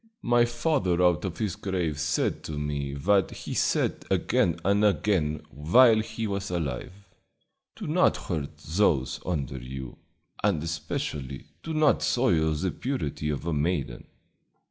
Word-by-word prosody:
My 120 0 +4
father 120 - 0
out 90 -1 +3
of 90 - -4
his 105 -4 -2
grave 90 -6 -2
said 80 -1 0
to 80 - -5
me 70 -1 -3
what 95 +5 +2
he - - -8
had - - -2
said - - 0
again 85 -2 +1
and 100 +2 +3
again 95 -7 +1
while 110 - +5
he 110 +1 -3
was 100 -1 -3
alive: 80 -8 -3 0.8
'Do - - -7
not - - +3
hurt 75 -4 -4
those 80 -6 +1
under 70 -7 -2
you; 65 0 -7 0.5
and 95 -7 +2
especially 75 -4 -4 0.2
do 160 -1 -4
not 155 -1 +4
soil 85 -11 +2
the 90 +4 -1
purity 75 - -3
of 75 0 -3
a 85 - -1
maiden.' 75 -5 -1
85 Hz, 145 wpm, -27 LUFS, 75-105 Hz, 0.8 s, while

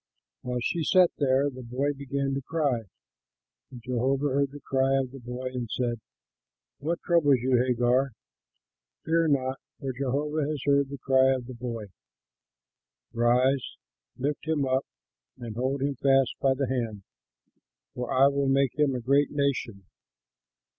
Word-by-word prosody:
While 125 -1 -3
she 165 +4 -1
sat 180 +2 +5
there, 135 0 +3
the 130 0 -9
boy 130 +4 -1
began 140 0 -2
to 135 - -2
cry; 135 -6 -1 0.8
and 120 -2 -11
Jehovah 130 +3 0
heard 140 +1 +1
the 145 - -9
cry 135 -1 +1
of 130 -2 -1
the 135 - -10
boy, 125 +1 -7
and 120 -3 -4
said, 120 -1 -2 0.8
"What 160 +5 -3
troubles 150 -6 +4
you, 130 0 +3
Hagar? 125 +1 +1 0.9
Fear 165 0 +2
not, 135 -2 0 0.2
for 135 -3 -3
Jehovah 140 +4 -1
has 155 -1 -2
heard 140 -1 +3
the 140 - -6
cry 130 0 +3
of 125 -2 -5
the 130 - -8
boy. 115 -2 -5 1.3
Rise, 125 +3 +2 0.4
lift 145 +4 -3
him 155 -3 +1
up, 130 +1 0 0.5
and 120 -4 -7
hold 130 +3 -1
him 140 0 0
fast 135 -2 +3
by 135 -1 +2
the 135 0 -1
hand, 115 -5 -3 0.9
for 125 -1 -4
I 130 +1 +5
will 140 -1 +2
make 135 0 +1
him 145 -3 +3
a 125 - -3
great 140 +4 +3
nation." 135 -9 -2
135 Hz, 155 wpm, -27 LUFS, 125-140 Hz, 1.3 s, sat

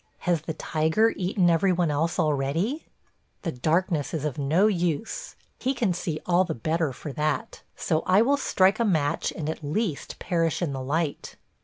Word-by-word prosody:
Has 175 -3 +2
the 160 0 -5
tiger 160 +9 +1
eaten 185 0 +1
every 170 +3 +3
one 175 -3 +1
else 160 +3 0
already?... 160 - 0 0.6
The 170 - -1
darkness 160 +3 0
is 155 -2 -3
of 150 -2 -3
no 155 +8 +3
use; 185 - -1 0.2
he 265 +2 0
can 225 -7 +1
see 165 -3 -3
all 180 +1 +4
the 170 -3 -3
better 160 +4 0
for 135 +3 -7
that; 155 +10 -2
so 160 -2 0
I 190 +4 +5
will 280 +4 +3
strike 195 -7 +2
a - - +3
match 155 -9 +1
and 150 - -5
at 160 0 -4
least 155 +2 -2
perish 165 -2 0
in 165 -6 -1
the 135 - -4
light. 150 +3 -2
165 Hz, 180 wpm, -26 LUFS, 150-185 Hz, 0.6 s, I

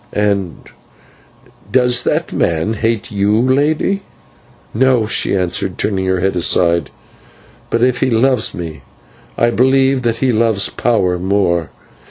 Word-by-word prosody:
"And 100 -4 -1 1.1
does 125 -1 +3
that - - -1
man 85 +6 0
hate 115 +1 -2
you, 105 +1 +1
Lady?" 145 +9 +1 0.7
"No," 125 -1 +2
she 105 - 0
answered, 90 -2 -2
turning 95 -2 -1
her 95 -1 0
head 95 +1 0
aside; 85 -2 +2 0.8
"but 115 - 0
if 125 -1 +1
he 130 - +1
loves 125 0 +1
me, 80 -4 -7 0.6
I 120 0 +2
believe 130 +2 +2
that 115 -2 -1
he 130 0 +1
loves 110 -4 +1
power 95 -7 0
more. 90 -3 0
110 Hz, 130 wpm, -16 LUFS, 95-125 Hz, 1.1 s, does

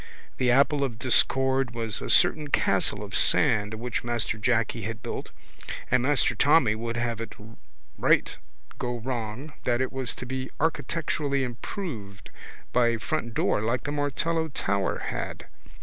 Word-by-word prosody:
The 125 - +2
apple 140 +3 +4
of 120 -5 -2
discord 130 +1 +3
was 115 -3 -2
a - - -5
certain 155 -1 +4
castle - - +1
of - - -6
sand 105 +1 +3
which 120 +1 -3
Master 115 -2 0
Jacky 115 0 +1
had 110 +2 -5
built - - -5 0.6
and 125 0 +4
Master 135 -1 +2
Tommy 135 -1 +4
would 115 +1 -4
have 120 -1 -2
it 115 - -7 0.6
right - - +3 0.4
go 120 0 -2
wrong 120 +3 -5
that 120 -1 +1
it 130 0 -1
was 130 -2 -3
to - - -7
be 130 +1 -4
architecturally 150 -2 -1
improved 120 - -6 0.4
by 125 -1 +4
a 115 0 +1
frontdoor 120 -5 -1
like 115 +3 -1
the 145 - -3
Martello 150 +3 0
tower 100 -9 -1
had. - - -5
125 Hz, 150 wpm, -26 LUFS, 115-140 Hz, 0.6 s, apple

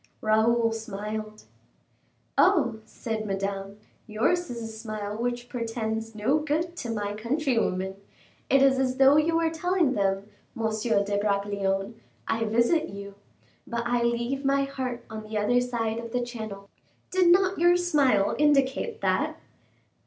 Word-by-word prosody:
Raoul 225 +2 +3
smiled. 215 0 -5 0.9
"Oh!" 280 - +3
said 220 0 -4
Madame, 195 0 -3 0.3
"yours 345 +12 0
is 235 -1 -5
a - - -4
smile 215 -2 -5
which 240 +1 -3
portends 225 -2 -3
no 225 +9 +2
good 315 +3 -1
to 240 - -5
my 205 -2 -2
countrywomen. 225 -6 -1 0.5
It 275 0 +5
is 265 -1 +4
as 255 -1 0
though 270 +2 +6
you 320 +2 +2
were 330 -1 +2
telling 335 -3 +1
them, 195 -2 0 0.3
Monsieur 220 -2 +1
de 200 0 -1
Bragelonne: 200 +1 -1 0.3
'I 225 0 0
visit 235 +9 +2
you, 200 0 -8 0.5
but 235 0 -2
I 240 0 +1
leave 235 +3 -1
my 275 0 +2
heart 255 -3 -4
on 220 0 -7
the 215 0 -5
other 245 +4 +3
side 230 -2 -2
of 230 0 -7
the 245 -1 0
Channel.' 220 -5 -7 0.4
Did 370 -1 +3
not 375 0 +3
your 350 +1 +5
smile 285 - +2
indicate 295 - +2
that?" - - 0
235 Hz, 145 wpm, -27 LUFS, 215-275 Hz, 0.9 s, though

